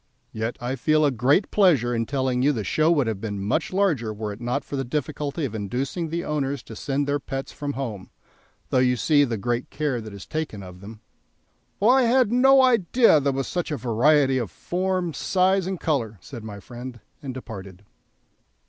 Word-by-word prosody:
Yet 110 +2 -3
I 125 +2 -3
feel 155 +4 +2
a 145 - +3
great 135 - +2
pleasure 150 - +3
in 115 -1 -1
telling 130 -2 0
you 140 +3 +4
the 110 -5 -3
show 155 - +2
would 145 -6 +3
have 110 -3 -3
been 100 -3 -4
much 100 +2 -1
larger 170 - +1
were 105 0 -4
it 105 - -12
not 120 +4 -1
for - - -5
the 135 - -1
difficulty 145 +3 -3
of 120 - -5
inducing 130 - -3
the 170 +2 -3
owners 140 -3 -2
to 110 - -10
send 140 +5 -1
their 145 0 0
pets 135 -1 -5
from 145 -1 -4
home, 115 -9 -5 0.6
though 130 - +3
you 125 0 +3
see 145 +4 +3
the 115 -4 -3
great 120 +4 -2
care 145 -6 -2
that 110 -1 -9
is 100 -1 -10
taken 155 -11 -4
of 90 0 -11
them." 110 +2 -11 0.8
"Well, 215 +5 +5
I 265 +1 +5
had 245 -2 +3
no 265 +2 +6
idea 230 -6 +4
there 140 0 +1
was 135 0 -2
such 175 -2 -2
a 150 - -2
variety 130 +3 +3
of 115 -6 -3
form, 180 - -2
size, 185 +5 +1
and 190 -2 -3
colour," 115 -9 -1
said 120 +1 -10
my 105 -2 -8
friend, 120 +3 -9 0.2
and 135 - -5
departed. 100 -7 -9
135 Hz, 200 wpm, -24 LUFS, 115-155 Hz, 0.8 s, no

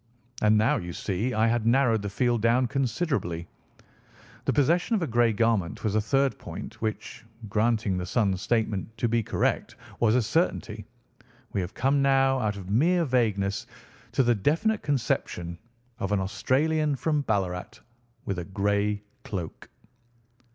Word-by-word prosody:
And 110 0 +4
now, 110 +2 +3
you 85 -1 -5
see, 100 +7 -2
I 110 +1 +3
had 115 -1 +1
narrowed 120 -3 +3
the 100 - -3
field 120 +2 +1
down 120 +3 +3
considerably. 125 - -1 1.0
The - - +2
possession 170 - +2
of 195 - 0
a - - +1
grey 120 -3 +3
garment 105 - 0
was 105 - 0
a 110 - +2
third 135 +5 +1
point - - -8
which, 110 -1 -4 0.3
granting 110 -3 +1
the 90 - -3
son's 100 -3 +1
statement 110 -1 -1
to 120 - +1
be 115 0 +1
correct, - - -1 0.2
was 115 -1 +3
a 125 - +4
certainty. 110 - -1 0.7
We 100 - 0
have 90 +3 -6
come 135 +2 +2
now 135 -1 +3
out 105 -3 -1
of 95 -2 -8
mere 170 - +3
vagueness 105 -7 0 0.5
to 135 - +3
the 120 -1 +4
definite 165 - +1
conception 90 - -2 0.4
of 95 - -2
an 105 - +2
Australian 145 +10 +1
from 150 +2 0
Ballarat 95 -7 -2 0.5
with 95 -2 -2
a 85 - -5
grey 100 +1 0 0.2
cloak." 90 -6 -6
115 Hz, 155 wpm, -27 LUFS, 100-135 Hz, 1.0 s, And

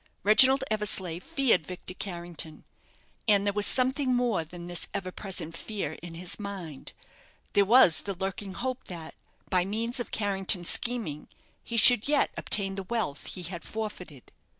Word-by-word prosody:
Reginald 260 +6 +7
Eversleigh 190 -5 0
feared 205 - +1
Victor 180 0 -7
Carrington. 170 -4 -6 0.6
And 200 -2 +4
there 200 - +1
was 205 0 +3
something 260 0 +2
more 240 -8 0
than 175 +2 -11
this 175 -1 -4
ever 185 -1 -3
present 180 -5 -5
fear 200 -5 -4
in 170 -1 -9
his 175 +4 -2
mind; 190 -8 -7 0.6
there 200 - +4
was 205 -6 +6
the 200 -1 -4
lurking 190 +1 -5
hope 255 0 -4
that, 165 -3 -8 0.4
by 180 -1 +3
means 230 +6 -2
of 240 - -4
Carrington's 195 -4 +1
scheming, 225 -12 -2 0.4
he 235 - -5
should 235 +1 +7
yet 290 0 +2
obtain 195 -2 +2
the 195 - -5
wealth 220 -12 -3
he 180 - -5
had 175 -1 -6
forfeited. 185 - -7
195 Hz, 155 wpm, -28 LUFS, 175-225 Hz, 0.6 s, Reginald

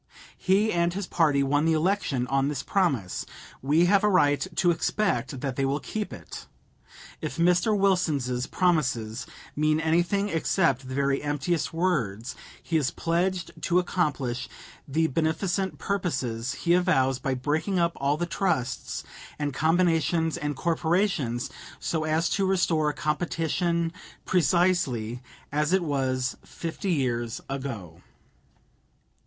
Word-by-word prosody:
He 200 +4 +2
and 170 0 +1
his 200 0 -2
party 150 -6 +2
won 145 +3 +2
the 165 - +3
election 160 -6 +1
on 135 +1 +1
this 140 -2 -2
promise. 140 - 0 0.4
We 150 +6 +3
have 200 +2 +4
a 210 - +4
right 145 -4 +3
to 175 - +3
expect 135 - -1
that 135 -3 -3
they 135 - +1
will 135 +2 +1
keep 215 +4 -4
it. - - -9 0.7
If - - -4
Mr. 180 +5 +3
Wilson's 155 -11 +1
promises 130 -10 0 0.3
mean 155 +1 +2
anything 175 +5 +1
except 160 -6 +1
the 130 - -5
very 140 0 +1
emptiest 145 +3 -1
words, 135 - -1 0.3
he 165 - 0
is 140 -4 +1
pledged 175 +2 -1
to 175 - +2
accomplish 150 -9 -1 0.4
the 160 +4 +1
beneficent 170 +5 0
purposes 135 - -2
he 170 +3 +1
avows 135 -8 +2
by 130 0 -1
breaking 155 +9 -1
up 170 -1 +3
all 140 +2 +1
the 175 - -1
trusts 140 -9 -2 0.3
and 145 -2 -2
combinations 165 0 +2
and 150 -4 -3
corporations 165 - 0 0.3
so 160 -2 -1
as 160 +2 +1
to 195 -1 +1
restore 165 -5 +2
competition 165 +2 -1 0.3
precisely 170 - +1 0.3
as 150 +3 +1
it 190 -2 +3
was 130 -4 -1
fifty 170 +3 -4
years 120 -6 -1
ago. 115 - -6
160 Hz, 130 wpm, -26 LUFS, 135-175 Hz, 0.7 s, have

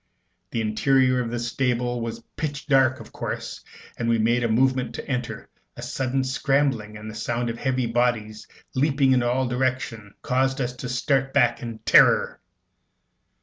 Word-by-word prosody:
The 115 - -2
interior 130 +4 +2
of 120 - -3
the 120 - -3
stable 120 0 -1
was 115 0 -5
pitch 145 -1 -4
dark, 130 -3 +3
of 115 - -12
course. - - -5 0.3
As 115 - -2
we 115 0 +3
made 120 +2 +2
a 115 - +1
movement 125 0 +1
to - - -7
enter, 125 -3 -4 0.3
a - - -7
sudden 130 0 -1
scrambling, 130 -5 0
and 105 +1 -9
the 110 - -7
sound 120 +2 -2
of 115 - -8
heavy 130 -2 0
bodies 115 -2 -1 0.3
leaping 135 0 +2
in 130 -1 +4
all 125 +2 +1
directions, 125 -4 -2
caused 130 +1 +1
us 125 -1 -2
to 125 - -5
start 135 +2 0
back 125 -4 +3
in 115 -2 -6
terror. - - +5
125 Hz, 165 wpm, -24 LUFS, 115-130 Hz, 0.3 s, terror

